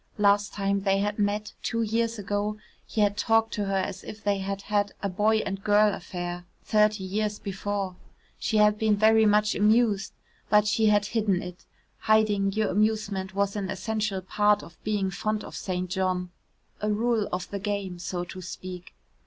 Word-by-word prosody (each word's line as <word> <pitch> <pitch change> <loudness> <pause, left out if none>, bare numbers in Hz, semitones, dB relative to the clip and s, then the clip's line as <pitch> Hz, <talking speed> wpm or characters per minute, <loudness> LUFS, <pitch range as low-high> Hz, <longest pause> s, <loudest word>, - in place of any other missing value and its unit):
Last 205 0 +3
time 200 0 0
they 195 0 +1
had 205 +2 -1
met, 205 +1 -1
two 230 -1 -1
years 230 +1 0
ago, 205 +1 -2 0.3
he 215 - -1
had 205 -1 +3
talked 225 +1 +2
to 205 -2 -1
her 195 0 0
as 185 0 -3
if 215 +1 -9
they 200 -1 +1
had 195 +1 -4
had 205 -1 0
a 200 - 0
boy 215 +4 +2
and 195 0 -4
girl 210 0 +4
affair 175 -1 -5 0.2
thirty 210 -2 +2
years 210 +2 -1
before. 195 -1 -3 0.4
She 220 - 0
had 210 0 +4
been 220 -1 +3
very 220 +1 +5
much 210 0 +3
amused 210 -1 +2 0.4
but 210 0 +5
she 215 +1 +2
had 205 -1 +4
hidden 205 -4 0
it; 180 0 -10 0.3
hiding 210 -2 +3
your 215 +1 0
amusement 205 -2 0
was 200 0 0
an 200 -2 -3
essential 205 0 -2
part 210 +2 +2
of 170 - -15
being 205 -3 0
fond 215 +3 -2
of - - -9
St. 185 -1 -3
John 180 -1 -1 0.5
a 210 - 0
rule 220 0 +1
of 180 0 -3
the 200 - -3
game, 200 -3 -3
so 175 0 -3
to 185 +1 -8
speak. 180 0 -8
205 Hz, 180 wpm, -27 LUFS, 195-215 Hz, 0.5 s, very